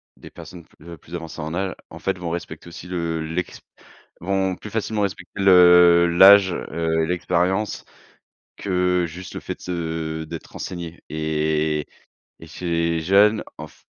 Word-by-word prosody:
des - - -13
personnes 90 -2 -12
pl 80 +2 -17
heu, 85 - -9
plus 85 - -10
avancées 80 -2 -7
en 80 +2 -5
âge 95 +1 -2
en - - -11
fait 95 -2 -3
vont 85 -2 -4
respecter 85 +1 -6
aussi 85 +1 -10
le 85 -2 -3
l'ex 80 +3 -4 0.6
vont 95 0 -1
plus 105 - -10
facilement 110 0 -2
respecter 100 0 -5
le 90 -2 +7
l'âge, 95 +3 +7
heu, 80 -1 -1
et - - -3
l'expérience 90 +4 -1 0.7
que 90 -2 0
juste 85 +1 -10
le - - -5
fait - - -5
de - - -28
se 80 -2 -4
d'être 80 +1 -9
renseigné 85 -2 -7
et 75 -1 -1 0.5
et - - -11
ces 85 0 -2
jeunes 100 +5 +4
en 75 - -7
f 75 - -20
85 Hz, 165 wpm, -22 LUFS, 80-95 Hz, 0.7 s, le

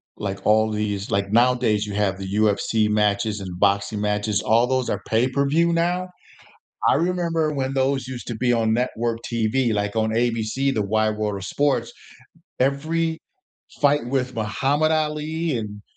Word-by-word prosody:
like, 100 -1 -4
all 110 +1 +3
these 105 -2 -3
like, 100 0 0
nowadays, 115 -3 +3
you 105 - -6
have 100 -2 0
the 95 0 -6
UFC 105 +1 +2
matches 105 0 +1
and 90 -2 -7
boxing 100 +2 +1
matches, 105 0 0
all 115 +2 +3
those 130 0 -1
are - - -2
pay-per-view 140 +8 +2
now? 175 +2 0 0.8
I - - +5
remember 165 -1 0
when 135 -1 -2
those 135 -1 0
used 125 -2 -7
to 115 - -4
be 120 +1 +1
on 110 -2 +2
network 120 -1 -1
TV, 115 +1 +1
like, 105 +1 -2
on 110 0 +1
ABC, 120 +3 0
the 110 - 0
Wide 110 +1 +1
World 105 -2 -2
of 95 - -7
Sports, 130 +1 0 0.7
every 160 +5 0 0.6
fight 145 -3 +3
with 130 0 -2
Muhammad 135 +8 +1
Ali 155 -1 -1
and 105 -2 -6
115 Hz, 160 wpm, -23 LUFS, 105-140 Hz, 0.8 s, I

